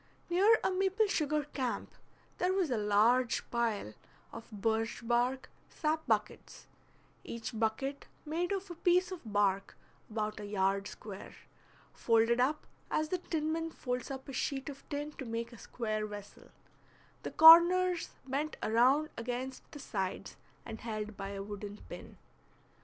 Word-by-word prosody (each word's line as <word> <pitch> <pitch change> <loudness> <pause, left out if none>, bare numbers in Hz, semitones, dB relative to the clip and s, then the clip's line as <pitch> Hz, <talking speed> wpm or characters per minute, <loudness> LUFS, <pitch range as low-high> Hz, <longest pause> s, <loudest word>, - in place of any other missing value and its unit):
Near 405 +6 +6
a - - +2
maple 385 +3 +2
sugar 305 -6 0
camp 265 -3 -3 0.5
there 365 +1 +2
was 370 -7 +1
a 240 - +1
large 225 +4 +3
pile 225 - -1 0.4
of 230 0 -9
birch 225 +2 -2
bark 245 +2 +1 0.2
sap 315 0 -1
buckets, - - -2 0.6
each 230 +1 -6
bucket 250 +6 -1 0.2
made 335 +4 -1
of 395 -1 -3
a - - -4
piece 355 +2 +2
of 370 - -6
bark 200 -1 +1 0.3
about 215 -1 -3
a 210 - -6
yard 195 0 0
square, 200 -2 -9 0.6
folded 230 +1 +3
up 285 +5 +1 0.2
as 310 0 0
the 365 - -1
tinman 325 0 -2
folds 250 -5 -4
up 265 0 -6
a 275 - -7
sheet 270 +3 -2
of 275 -1 -9
tin 290 0 -3
to - - -3
make 230 +1 -4
a 235 - -12
square 215 -2 -3
vessel, 205 -1 -10 0.7
the - - -4
corners 345 +2 +8 0.2
bent 285 +4 -2
around 260 +7 +4
against 250 +3 -5
the - - -9
sides 195 -9 -4 0.3
and 225 -1 -7
held 215 -2 -4
by 195 0 -5
a 200 0 -5
wooden 205 0 -7
pin. - - -10
250 Hz, 145 wpm, -32 LUFS, 215-310 Hz, 0.7 s, corners